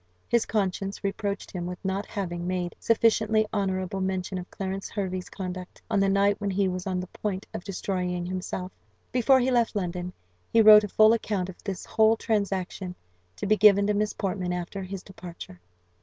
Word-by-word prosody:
His 235 -1 +2
conscience 195 -1 -2
reproached 200 0 -3
him 175 -2 -4
with 180 0 -5
not 195 +2 -1
having 175 -3 -4
made 180 -1 -2
sufficiently 220 -1 +3
honourable 190 -2 -1
mention 190 0 -2
of 180 - -9
Clarence 195 0 -4
Hervey's 185 -3 -3
conduct, 185 -1 -6
on 205 - +3
the 195 0 +3
night 200 +1 +2
when 200 - -1
he 195 0 +1
was 185 0 -3
on 185 -1 -1
the 180 - -3
point 190 +1 -4
of - - -5
destroying 180 -2 -2
himself. 185 0 -4 0.4
Before 255 +2 +4
he 255 +1 +1
left 235 -2 +2
London 180 -2 -3 0.4
he 230 - +4
wrote 215 -1 +9
a - - -2
full 215 +2 +5
account 205 -5 -1
of 180 - -11
this 195 -3 -4
whole 220 0 +4
transaction, 195 -4 -2 0.4
to - - -5
be 215 +2 +4
given 200 -1 +6
to 210 - +2
Miss 210 +1 0
Portman 185 -2 -2
after 180 +2 -4
his 190 0 -6
departure. 175 - -10
195 Hz, 185 wpm, -27 LUFS, 180-210 Hz, 0.4 s, wrote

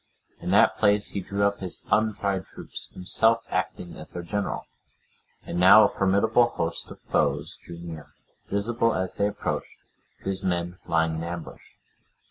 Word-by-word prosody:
In - - -5
that - - +4
place 105 -1 +3
he 100 - -3
drew 100 +2 -2
up 100 0 +2
his 95 -2 -6
untried 100 -3 +1
troops, - - -7
himself 110 +5 +3
acting 90 -1 -3
as 80 - -10
their 85 - -5
general. 100 +3 -3 0.8
And 85 - -3
now 100 +4 +9
a 105 - +4
formidable 110 +5 +3
host 85 -5 -3
of - - -11
foes 75 +3 -1
drew 85 - -9
near, 85 -3 -8 0.4
visible, 115 +3 +1
as 95 0 -2
they 100 - +1
approached, 105 - -4 0.5
to - - -3
his 95 0 -2
men 90 -1 -2
lying 80 0 +2
in 80 +1 -3
ambush. 85 0 -6
95 Hz, 160 wpm, -26 LUFS, 85-105 Hz, 0.8 s, now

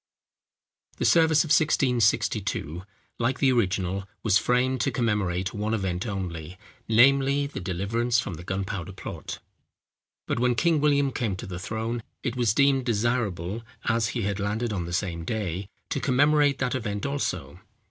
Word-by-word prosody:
] - - -39
The - - -1
service 160 -2 +5
of 160 - -7
1662, 115 - +2 0.4
like 120 +3 +1
the 135 -2 +3
original, 95 -4 0 0.2
was 105 -3 +4
framed 125 +2 +1
to - - +2
commemorate 100 -7 0
one 105 +1 -1
event 95 0 -2
only, 90 -4 -5 0.3
namely, 140 +4 +4
the 140 - -6
deliverance 100 +6 0
from 100 - -3
the 85 +1 -8
gunpowder 95 0 -4
plot; 95 - -7 0.9
but - - -1
when 125 0 +2
King 165 +1 +2
William 140 -2 +3
came 115 -8 -1
to - - -7
the 90 -2 -6
throne, 110 +4 -3 0.2
it 125 -2 -2
was 120 -4 +1
deemed 140 -1 +4
desirable, 110 -4 -1 0.2
as 115 -2 +2
he 115 - -1
had 100 0 -1
landed 105 +3 -1
on 90 -4 -2
the 85 - -6
same 85 -2 -2
day, 95 -1 -3 0.2
to - - 0
commemorate 145 +1 +3
that 125 -2 -1
event 105 -5 -3
also. 90 - -3
110 Hz, 160 wpm, -26 LUFS, 95-130 Hz, 0.9 s, service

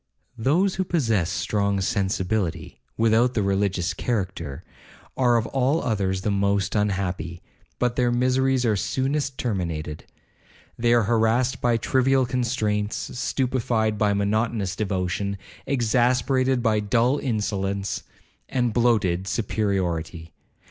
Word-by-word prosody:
'Those 160 - +2
who 190 - 0
possess 115 - +1
strong 100 +3 0
sensibility, 95 -4 -1 0.2
without 115 +3 +3
the 105 - +1
religious 95 -2 0
character, 90 - -3 0.5
are 120 -2 +3
of 115 - 0
all 135 +4 +1
others 95 -5 0
the 105 - 0
most 100 0 +1
unhappy, 95 -5 -1 0.4
but 125 -1 0
their 120 -1 +2
miseries 130 +1 +2
are 110 -2 +2
soonest 135 +7 -1
terminated. 85 -9 -3 0.7
They 120 0 +1
are 120 - +4
harassed 115 +3 +1
by 120 -1 +2
trivial 130 +3 +2
constraints, 110 -4 -1 0.2
stupified 115 -6 0
by 105 -1 +3
monotonous 100 -1 0
devotion, 100 0 -2 0.3
exasperated 125 +1 +2
by 110 -2 +2
dull 120 +6 +2
insolence 100 -5 -2 0.5
and 120 -3 0
bloated 105 -7 +2
superiority. 95 -7 -2
110 Hz, 115 wpm, -24 LUFS, 95-125 Hz, 0.7 s, are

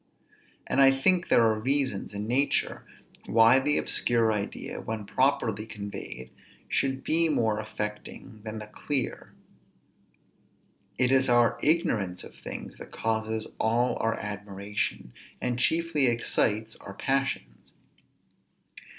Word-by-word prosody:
And 135 - +1
I 135 - +8
think 175 +7 +2
there 115 - +5
are 110 -1 +2
reasons 130 -4 0
in 100 0 -4
nature, 135 +5 +1 0.5
why 115 +5 +6
the 150 +2 +2
obscure 115 -2 +2
idea, 100 -1 -4
when 110 -2 -5
properly 115 -4 0
conveyed, 100 - -7 0.4
should 135 -1 0
be 165 +1 +4
more 110 -7 +1
affecting 105 +1 -6
than 110 0 -6
the 105 - -6
clear. 130 +4 -3 1.7
It 125 0 +2
is 135 -1 +4
our 120 -1 +3
ignorance 105 - +1
of - - -11
things - - -8
that - - -11
causes 110 0 -2
all 120 +3 +2
our 115 0 0
admiration, 100 -8 -4 0.3
and 125 -1 -2
chiefly 160 -1 +2
excites 110 -2 0
our 100 - -10
passions. 135 - -2
115 Hz, 120 wpm, -27 LUFS, 105-135 Hz, 1.7 s, I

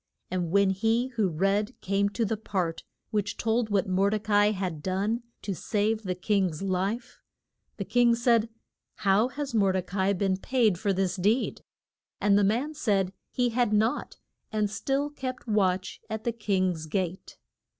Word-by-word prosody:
And 180 -2 -1
when 200 +2 +4
he 225 +6 +1
who 220 -6 0
read 195 +8 0
came 200 +1 +1
to 225 +2 -1
the 220 - 0
part 185 -6 -2 0.3
which 205 -1 -1
told 225 0 0
what 200 -2 +1
Mor 190 +2 +2
de 215 - +1
ca 215 0 -4
i 205 0 +6
had 185 -7 -3
done 200 +7 -1 0.2
to 200 - -2
save 215 +3 0
the 185 -4 -3
king's 185 -3 0
life, 195 +6 -2 0.6
the - - -3
king 240 -1 +4
said, 235 -1 +3 0.6
How 200 +4 +4
has 280 0 -5
Mor 200 -4 +3
de 185 -1 0
ca 185 +2 -6
i 190 +1 +3
been 190 0 0
paid 220 -4 +1
for 205 -1 +1
this 190 -1 0
deed? 210 +7 +1 0.6
And 205 0 +3
the 205 - +4
man 240 +10 +1
said 200 -10 0 0.2
he 245 -1 +1
had 245 +1 +2
had 210 - -2
nought, 220 +3 0 0.3
and 210 -2 0
still 275 +7 -1
kept 255 -3 -6
watch 190 -3 0
at 220 0 -4
the 235 - 0
king's 185 -7 -1
gate. 185 +1 -3
205 Hz, 180 wpm, -28 LUFS, 190-225 Hz, 0.6 s, i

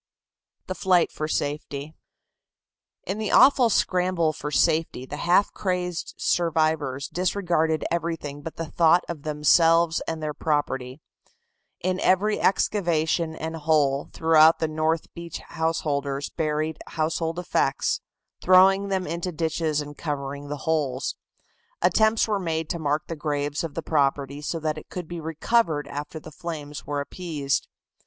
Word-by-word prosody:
THE 185 - -3
FLIGHT 185 -2 +2
FOR 155 - -3
SAFETY. 145 0 -3 1.1
In 195 +4 -4
the 215 - -2
awful 260 -3 +6
scramble 180 -5 +1
for 150 - -5
safety 150 -1 +1
the 145 - -7
half 180 +5 +3
crazed 180 -3 -3
survivors 155 -5 0
disregarded 175 -4 0
everything 165 -4 -3
but 160 +2 -7
the 165 - -4
thought 170 +2 +4
of 165 -4 -5
themselves 165 +3 +3
and 160 -1 -3
their 155 -1 -3
property. 140 -3 -2 0.8
In 185 +1 -1
every 205 +3 +2
excavation 170 -5 +1
and 160 +1 -5
hole 145 -3 +1
throughout 160 0 +5
the 160 - 0
north 155 +1 -1
beach 170 -1 -7
householders 145 -4 -2
buried 155 0 -2
household 165 +1 -2
effects, 165 -6 0 0.4
throwing 190 +2 +5
them 190 -2 -1
into 170 +3 -3
ditches 160 -2 -1
and 145 0 -8
covering 145 -1 -4
the 145 -1 -6
holes. 145 -5 0 0.6
Attempts 220 +1 +3
were 210 -2 0
made 160 -3 -2
to 170 - -3
mark 150 0 0
the 165 - -5
graves 145 -1 -2
of 160 -3 -5
the 165 - -3
property 140 -1 0
so 165 +2 -3
that 155 -1 -2
it - - -17
could 180 -3 -6
be 175 0 -6
recovered 160 0 0
after 145 +2 -6
the 155 - -11
flames 150 -2 -7
were 145 -1 -1
appeased. 145 -3 -2
160 Hz, 140 wpm, -25 LUFS, 150-170 Hz, 1.1 s, awful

